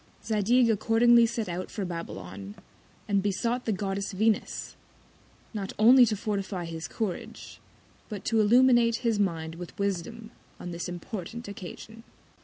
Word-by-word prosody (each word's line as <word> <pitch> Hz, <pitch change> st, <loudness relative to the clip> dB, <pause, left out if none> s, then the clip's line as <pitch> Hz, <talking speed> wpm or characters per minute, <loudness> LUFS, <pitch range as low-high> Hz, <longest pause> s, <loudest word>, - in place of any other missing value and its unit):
Zadig 230 Hz, +3 st, +3 dB
accordingly 230 Hz, +2 st, +5 dB
set 225 Hz, -1 st, -3 dB
out 180 Hz, +1 st, -4 dB
for 200 Hz, -, -4 dB
Babylon, 100 Hz, -, -7 dB, 0.5 s
and 200 Hz, -1 st, +2 dB
besought 230 Hz, +5 st, -1 dB
the 225 Hz, -, 0 dB
Goddess 195 Hz, 0 st, -2 dB
Venus, 215 Hz, +2 st, 0 dB, 0.8 s
not 200 Hz, -3 st, -4 dB
only 245 Hz, +3 st, +7 dB
to 215 Hz, -, 0 dB
fortify 195 Hz, -3 st, -3 dB
his 165 Hz, -1 st, -6 dB
Courage, 205 Hz, -6 st, -5 dB, 0.5 s
but 205 Hz, -3 st, -7 dB
to 225 Hz, -1 st, +3 dB
illuminate 240 Hz, +1 st, +5 dB
his 225 Hz, -3 st, +2 dB
Mind 165 Hz, -5 st, -1 dB
with 175 Hz, +1 st, -9 dB
Wisdom 200 Hz, +4 st, -3 dB, 0.3 s
on 175 Hz, -, -6 dB
this 170 Hz, 0 st, -4 dB
important 190 Hz, +5 st, -6 dB
Occasion. 200 Hz, +3 st, -9 dB
205 Hz, 135 wpm, -28 LUFS, 180-225 Hz, 0.8 s, only